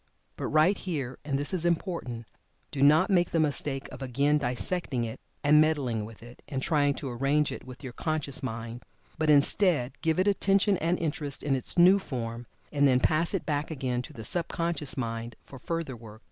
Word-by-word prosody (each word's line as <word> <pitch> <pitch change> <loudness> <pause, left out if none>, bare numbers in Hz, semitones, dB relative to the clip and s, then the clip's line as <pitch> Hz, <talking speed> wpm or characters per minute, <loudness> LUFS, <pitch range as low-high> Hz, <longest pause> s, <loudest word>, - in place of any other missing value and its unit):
But - - -4
right 155 +6 +4
here 145 -10 -4
and 140 -2 -1
this 145 +6 0
is 180 -3 0
important 170 - -2 0.5
do 135 - -3
not 155 +7 +5
make 175 -2 +3
the 165 - 0
mistake 145 -2 -1
of 125 - -9
again 140 +3 +1
dissecting 130 +1 -2
it, 110 - -6 0.2
and 150 +1 +6
meddling 135 -9 0
with 115 +1 -12
it, 120 +1 -13
and 135 - -3
trying 145 0 +2
to 135 - -5
arrange 140 +4 +1
it - - -8
with 130 +2 -11
your 130 -2 -6
conscious 155 -3 -2
mind. 115 -1 -5 0.4
But, 155 -1 +1
instead, 145 -2 +3
give 160 -1 +1
it 185 +2 +2
attention 195 0 +3
and 170 +3 +1
interest 150 -3 -2
in 140 -2 +1
its 130 - -4
new 185 +3 +7
form, 120 - -5 0.2
and 145 -1 +4
then 130 -2 +4
pass 165 +7 +1
it 190 - -3
back 150 0 -1
again 130 -5 -2
to - - -10
the 110 - -8
sub 170 +7 -1
conscious 165 -5 -2
mind 115 -2 -4
for 135 - -11
further 165 -2 -3
work. 110 -2 -12
145 Hz, 200 wpm, -28 LUFS, 125-165 Hz, 0.5 s, new